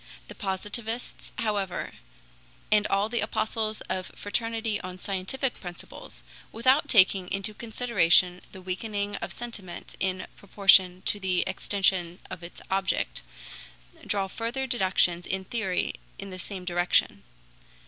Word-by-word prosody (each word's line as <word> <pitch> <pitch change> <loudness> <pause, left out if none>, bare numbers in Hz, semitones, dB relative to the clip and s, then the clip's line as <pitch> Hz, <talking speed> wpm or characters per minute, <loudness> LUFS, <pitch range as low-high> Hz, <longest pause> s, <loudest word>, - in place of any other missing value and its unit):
The - - -7
Positivists, 215 +4 -3
however, 205 -4 -1 0.8
and 210 0 +5
all 195 +1 +2
the 235 +1 -1
apostles 215 0 -1
of 185 0 -4
fraternity 225 0 -1
on 185 -1 -6
scientific 195 +8 -2
principles, 175 -2 -9 0.3
without 260 +6 +3
taking 190 -3 +5
into 195 +2 -2
consideration 205 -6 +3
the 185 - -10
weakening 205 +2 -2
of - - -4
sentiment 215 -7 -7
in 185 -1 -1
proportion 190 -2 +5
to 205 - +1
the 185 -2 +1
extension 190 -2 +1
of 180 - -6
its 170 +1 -9
object, 190 -1 0 0.8
draw 200 -2 +1
further 235 +6 -2
deductions 185 -7 +2
in 190 0 -2
theory 195 -4 0 0.2
in 195 0 -7
the 185 - -6
same 185 0 -6
direction. 175 - +2
195 Hz, 125 wpm, -27 LUFS, 185-220 Hz, 0.8 s, and